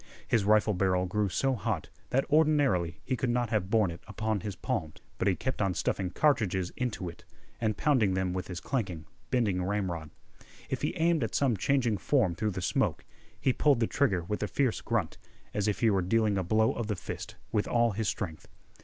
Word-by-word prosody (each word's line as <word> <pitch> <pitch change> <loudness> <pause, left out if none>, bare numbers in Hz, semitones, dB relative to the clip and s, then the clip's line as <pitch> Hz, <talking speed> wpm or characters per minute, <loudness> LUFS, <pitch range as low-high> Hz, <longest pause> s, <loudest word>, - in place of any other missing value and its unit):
His 110 -4 +2
rifle 105 0 +4
barrel 90 -1 +1
grew 105 +2 0
so 135 +8 +1
hot 110 -9 -2 0.2
that 135 +2 +1
ordinarily 145 - +3
he 130 - -1
could 125 0 -1
not 120 -1 0
have 100 -4 0
borne 105 -5 +3
it 85 - -9
upon 110 0 -1
his 100 +1 -5
palms; 100 - -3 0.2
but 95 - +1
he 95 - +3
kept 130 +3 -3
on 95 -3 +1
stuffing 95 -2 -1
cartridges 95 - +1
into 120 -7 -2
it, 85 - -9 0.4
and 110 -3 0
pounding 120 -11 +3
them 95 -1 0
with 90 -1 -3
his 90 -2 -5
clanking, 90 - -3 0.2
bending 105 -8 +1
ramrod. 90 -5 -2 0.6
If - - -1
he - - -1
aimed 165 -3 +2
at 115 - -3
some 135 -5 +3
changing 120 +1 +1
form 110 -7 +2
through 105 +6 -1
the 95 -2 -4
smoke, - - 0 0.3
he 130 - +2
pulled 145 -3 +3
the 115 - +3
trigger 110 - +1
with 105 +5 -3
a 105 - 0
fierce 130 -2 0
grunt, 110 -8 -1 0.3
as 105 0 0
if 105 - -1
he 115 -2 +4
were 95 -2 +2
dealing 105 +3 +2
a 95 - 0
blow 110 +5 +2
of 115 - -3
the 105 - -1
fist - - -7 0.2
with 105 -2 +1
all 120 -1 +3
his 105 +2 -2
strength. 80 -5 -5
105 Hz, 205 wpm, -30 LUFS, 95-120 Hz, 0.6 s, rifle